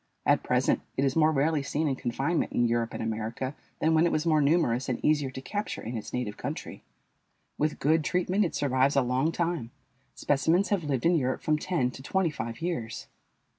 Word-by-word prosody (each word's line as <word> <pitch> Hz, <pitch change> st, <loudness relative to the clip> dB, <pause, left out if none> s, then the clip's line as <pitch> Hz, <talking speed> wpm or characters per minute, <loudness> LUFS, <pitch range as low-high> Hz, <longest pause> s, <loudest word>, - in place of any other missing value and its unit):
At -, -, +4 dB
present -, -, +1 dB, 0.2 s
it 135 Hz, -, +2 dB
is 135 Hz, -, 0 dB
more 155 Hz, -1 st, +4 dB
rarely 150 Hz, +1 st, +1 dB
seen 150 Hz, +3 st, -1 dB
in 135 Hz, -, 0 dB
confinement 135 Hz, +7 st, -1 dB
in 120 Hz, -, +3 dB
Europe 115 Hz, 0 st, -1 dB
and -, -, -3 dB
America 115 Hz, +4 st, -3 dB, 0.2 s
than 160 Hz, +1 st, +2 dB
when 160 Hz, +2 st, +4 dB
it -, -, 0 dB
was 155 Hz, +1 st, 0 dB
more 155 Hz, -2 st, +3 dB
numerous 140 Hz, -5 st, +2 dB
and 125 Hz, -, -1 dB
easier 145 Hz, -3 st, +2 dB
to 130 Hz, 0 st, -8 dB
capture 205 Hz, +9 st, -4 dB
in 115 Hz, +2 st, -5 dB
its 110 Hz, -, -6 dB
native 125 Hz, -5 st, -3 dB
country. -, -, -6 dB, 0.8 s
With 150 Hz, +1 st, 0 dB
good 155 Hz, +2 st, +2 dB
treatment 180 Hz, +5 st, +1 dB
it 175 Hz, -, -2 dB
survives 135 Hz, 0 st, +2 dB
a 140 Hz, -, +4 dB
long 130 Hz, +6 st, +1 dB
time; 170 Hz, -8 st, -2 dB, 0.5 s
specimens 160 Hz, +7 st, +2 dB
have 200 Hz, -5 st, +1 dB
lived 135 Hz, -4 st, -1 dB
in 170 Hz, -, +5 dB
Europe 130 Hz, -3 st, -1 dB
from 155 Hz, 0 st, +1 dB
ten 150 Hz, -8 st, 0 dB
to 130 Hz, -, -10 dB
twenty 175 Hz, +4 st, 0 dB
five 115 Hz, 0 st, -6 dB
years. 120 Hz, -11 st, -3 dB
145 Hz, 205 wpm, -28 LUFS, 125-165 Hz, 0.8 s, in